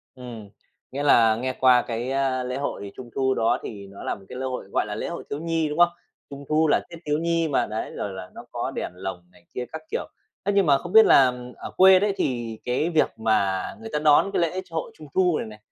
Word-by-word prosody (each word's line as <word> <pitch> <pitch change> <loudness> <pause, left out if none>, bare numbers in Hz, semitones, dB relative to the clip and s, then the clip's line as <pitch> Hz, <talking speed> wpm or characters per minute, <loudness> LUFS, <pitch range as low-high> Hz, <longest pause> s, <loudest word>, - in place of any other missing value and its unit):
Ừm, 120 -5 -9 0.4
nghĩa 140 +2 -3
là 115 -6 +5
nghe 130 +3 -2
qua 125 -1 +4
cái, 120 +1 -4
ơ, 135 -1 0
lễ 125 +1 -4
hội 100 -8 -4
Trung 120 -2 -9
Thu 130 -1 +1
đó 115 - +1
thì 100 -2 -8
nó 100 0 -11
là - - -1
một 100 - -15
cái 125 - -8
lễ 130 - -3
hội, 130 -1 -4
gọi - - +1
là, - - -4
lễ - - -4
hội - - -6
thiếu 140 - -3
nhi, 165 -1 -1
đúng 150 +3 -5
không? 175 0 +7 0.4
Trung 140 0 -9
Thu 155 +1 +3
là - - +4
Tết 170 - -9
thiếu 150 0 +1
nhi 165 0 0
mà, 140 - +1
đấy, 110 +1 -4
rồi 100 - -3
là 95 -1 -8
nó - - -10
có - - -2
đèn - - -4
lồng 90 -1 -7
này 90 -1 -23
kia 125 - -3
các 160 - -5
kiểu, - - -2 0.4
thế 205 - +1
nhưng 200 -3 +4
mà, 140 -2 +5
không 175 +6 -8
biết 220 0 +9
là 130 -2 +6 0.2
ở - - -8
quê 190 0 +7
đấy, 205 0 +1
thì 120 -4 -2
cái 130 +7 0
việc 160 -7 +1
mà 100 -4 +1 0.2
người 225 - -7
ta - - +1
đón 150 +5 +4
cái - - +1
lễ 180 +3 0
chội 165 -3 -5
Trung 155 - -11
Thu 180 -4 +3
này - - -4
này, 110 -1 -11
135 Hz, 260 wpm, -24 LUFS, 115-160 Hz, 0.4 s, biết